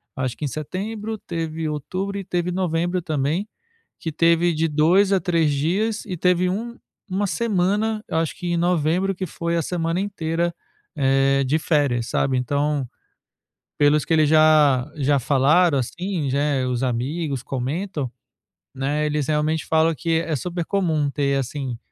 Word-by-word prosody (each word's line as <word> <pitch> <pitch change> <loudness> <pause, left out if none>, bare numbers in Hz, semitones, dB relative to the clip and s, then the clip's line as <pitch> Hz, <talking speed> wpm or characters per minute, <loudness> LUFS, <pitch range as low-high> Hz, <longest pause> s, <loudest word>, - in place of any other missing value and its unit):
acho 130 -2 -2
que 150 - -4
em - - 0
setembro, 205 - -4
teve 160 -1 -4
outubro 185 +7 -3
e 195 - -4
teve 175 -1 -2
novembro 175 -1 -1
também, 155 +5 -1 0.5
que 160 - -4
teve 170 +2 +3
de 165 +1 +1
2 170 +7 +3
a 190 - +4
3 165 -5 +1
dias 195 +10 0
e 180 - -5
teve 180 +1 +2
um 235 +5 -3 0.3
uma 195 +2 -1
semana, 210 +1 0
eu - - -2
acho 165 -1 -1
que 180 - -6
em 175 0 0
novembro, 175 +2 +1
que 185 -1 -4
foi 170 +2 -3
a - - +1
semana 165 +1 -1
inteira, 170 -4 -1 0.4
eh, 135 0 +3
de 150 +5 +2
férias, 140 -7 +1
sabe. 135 -1 +1
Então, 140 +1 0 0.9
pelos 145 0 +4
que 165 - 0
eles 155 -2 +4
já 155 -5 +5
já 140 0 +2
falaram 145 +4 +3
assim, 170 +2 -3
já 140 +2 0
é, 140 -3 +1
os 125 +1 -1
amigos 135 +3 -2
comentam, 140 +1 -3 0.6
né, 145 +3 -1
eles 150 -1 -1
realmente 155 +1 0
falam 160 0 +3
que 165 +2 -2
é 165 -2 -2
super 175 +3 -3
comum 160 -7 0
ter, 140 -1 0
assim, 130 -2 -4
160 Hz, 160 wpm, -22 LUFS, 145-180 Hz, 0.9 s, já